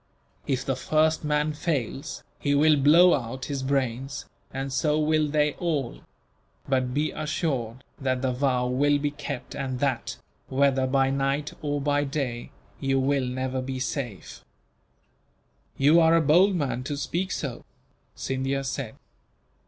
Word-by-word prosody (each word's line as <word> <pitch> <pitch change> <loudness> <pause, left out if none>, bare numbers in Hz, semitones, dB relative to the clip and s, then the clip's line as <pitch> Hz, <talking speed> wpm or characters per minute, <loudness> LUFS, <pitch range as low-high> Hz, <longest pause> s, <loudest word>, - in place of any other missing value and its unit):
If 130 -3 -1
the 135 - 0
first 155 +4 +1
man 150 0 +1
fails, 145 -3 -3 0.2
he 145 -1 +1
will 155 +2 +5
blow 160 +6 +6
out 130 0 -3
his 140 -1 -3
brains, 130 0 -2 0.3
and 135 0 -4
so 150 +1 +2
will 155 0 +2
they 150 0 +2
all; 150 -8 -1 0.7
but 130 -2 +1
be 150 +4 0
assured 135 -6 -2 0.2
that 130 -1 -1
the 130 - +1
vow 125 -1 +1
will 145 +4 +2
be 145 0 -1
kept 140 -3 -6
and 130 -2 -3
that, 135 -4 -1 0.3
whether 135 -1 +2
by 135 0 +2
night 140 +2 -1
or 145 -1 -1
by 145 0 +1
day, 135 -4 -3 0.3
you 135 0 +1
will 135 -1 +1
never 130 +1 -2
be 130 0 -4
safe." 125 - -5 1.3
"You 150 +5 +6
are 165 0 +5
a - - +5
bold 180 +6 +5
man 135 -6 -1
to 145 0 -3
speak 175 +6 -2
so," 135 -5 -4 0.5
Scindia 135 +1 -2
said. 135 -3 -4
140 Hz, 145 wpm, -26 LUFS, 130-150 Hz, 1.3 s, blow